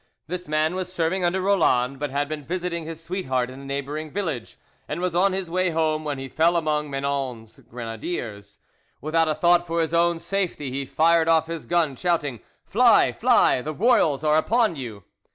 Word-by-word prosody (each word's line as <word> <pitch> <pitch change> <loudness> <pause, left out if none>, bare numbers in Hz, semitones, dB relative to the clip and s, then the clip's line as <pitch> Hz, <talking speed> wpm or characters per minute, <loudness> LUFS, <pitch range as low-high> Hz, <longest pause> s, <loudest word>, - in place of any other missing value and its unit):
This 180 +3 -5
man 155 +2 +1
was 185 -1 -4
serving 180 +1 -1
under 180 +2 +1
Roland, 140 -9 +2
but 145 0 -2
had 140 +2 -1
been 150 -1 -5
visiting 175 0 -3
his 165 0 -7
sweetheart 130 -9 -2
in 130 - -10
a - - -11
neighbouring 140 +3 -4
village, 160 - -4 0.3
and 150 - -4
was 180 -1 -1
on 190 +3 +3
his 190 -1 -3
way 185 +2 0
home 160 -1 0
when 145 -2 -3
he 135 0 -6
fell 165 +5 +2
among 150 -2 -1
Menon's 135 -5 -4
grenadiers. 115 - -6 0.4
Without 160 +3 +1
a 155 - 0
thought 175 +2 +3
for 170 0 -1
his 160 0 -1
own 170 0 +3
safety, 175 -7 -3
he 135 +1 -4
fired 165 +2 +3
off 160 -1 +4
his 165 -1 -6
gun, 165 -5 +1
shouting, 150 -7 -1 0.3
"Fly! - - +4
fly! 125 - +3
The 155 +3 -5
royals 160 - +3
are 155 0 +3
upon 220 +3 +2
you!" 115 -8 -7
155 Hz, 190 wpm, -24 LUFS, 140-175 Hz, 0.4 s, off